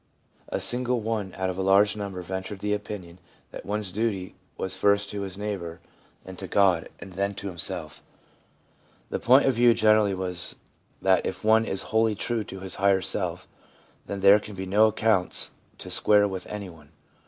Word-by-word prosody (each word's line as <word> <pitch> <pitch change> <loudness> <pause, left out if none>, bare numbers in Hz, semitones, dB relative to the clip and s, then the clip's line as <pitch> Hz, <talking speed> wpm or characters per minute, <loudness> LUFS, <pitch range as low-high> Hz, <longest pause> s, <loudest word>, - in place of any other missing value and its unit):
A - - -2
single 125 0 0
one 110 -3 -3
out 95 0 -1
of 95 - -7
a - - 0
large 100 +2 +4
number 100 -3 -6
ventured 95 +3 -5
the 105 +2 -2
opinion 100 -4 -7 0.3
that - - -10
one's 105 -2 -2
duty 100 -3 -2 0.2
was 95 -1 -4
first 100 +1 +2
to 100 - -5
his 95 -1 -6
neighbour 95 -5 -5 0.5
and 95 -1 -10
to 95 - -6
God, 95 -3 +2
and 95 - -11
then 100 +2 -2
to 100 - -8
himself. 85 -3 -5 1.1
The - - -2
point 130 +4 +5
of 135 - +3
view 120 0 +4
generally 110 -3 +3
was 90 -2 -3 0.5
that 95 -1 +3
if 95 - -6
one 110 +1 +4
is 95 - -1
wholly 110 -1 +2
true 115 +2 -2
to 95 0 -9
his 95 -1 -5
higher 100 -1 +3
self, - - -3 0.6
then 100 -1 -5
there 100 +2 +7
can 105 -1 -10
be 95 0 -5
no 105 +4 +4
accounts 110 -4 +5 0.3
to - - -9
square 105 -1 +4
with 95 -2 -6
any 105 -2 -6
one. 75 -3 -18
100 Hz, 185 wpm, -25 LUFS, 95-105 Hz, 1.1 s, there